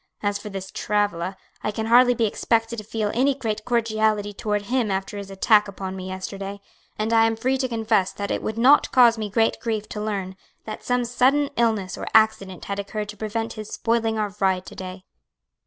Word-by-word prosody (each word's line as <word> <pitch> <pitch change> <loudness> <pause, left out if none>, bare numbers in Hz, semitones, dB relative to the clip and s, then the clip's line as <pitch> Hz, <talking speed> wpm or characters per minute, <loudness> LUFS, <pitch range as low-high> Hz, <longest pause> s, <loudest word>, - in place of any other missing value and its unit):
"As 205 0 0
for 210 - -8
this 195 -1 -6
Travilla, 200 -3 -1 0.3
I - - 0
can 220 +1 -3
hardly 245 +2 +6
be 230 - +2
expected 225 +2 0
to 215 - -5
feel 210 0 -2
any 270 +3 +2
great 220 -5 -3
cordiality 220 -3 +1
toward 210 0 -2
him 240 0 0
after 195 +1 -2
his 200 -1 -6
attack 210 +2 +3
upon 190 -1 -6
me 185 -1 -6
yesterday; 195 +1 -6 0.4
and 220 +2 -1
I 225 0 +6
am 225 - 0
free 255 +4 0
to 260 - +1
confess 220 -5 +1
that 200 0 -4
it - - -1
would 220 - -4
not 265 +5 +5
cause 235 -3 +6
me 215 -1 -3
great 225 +2 +1
grief 220 -2 -2
to 210 - -5
learn 195 -3 -3 0.3
that 215 - -7
some 245 0 0
sudden 265 +4 +2
illness 220 -6 0
or - - -5
accident 215 -4 +3
had 200 0 -3
occurred 205 +1 -4
to 210 - -8
prevent 225 +2 -3
his 215 -1 -8
spoiling 225 -1 0
our 210 -2 -2
ride 190 -1 +1
to - - -11
day." 185 0 -8
215 Hz, 205 wpm, -24 LUFS, 200-230 Hz, 0.4 s, hardly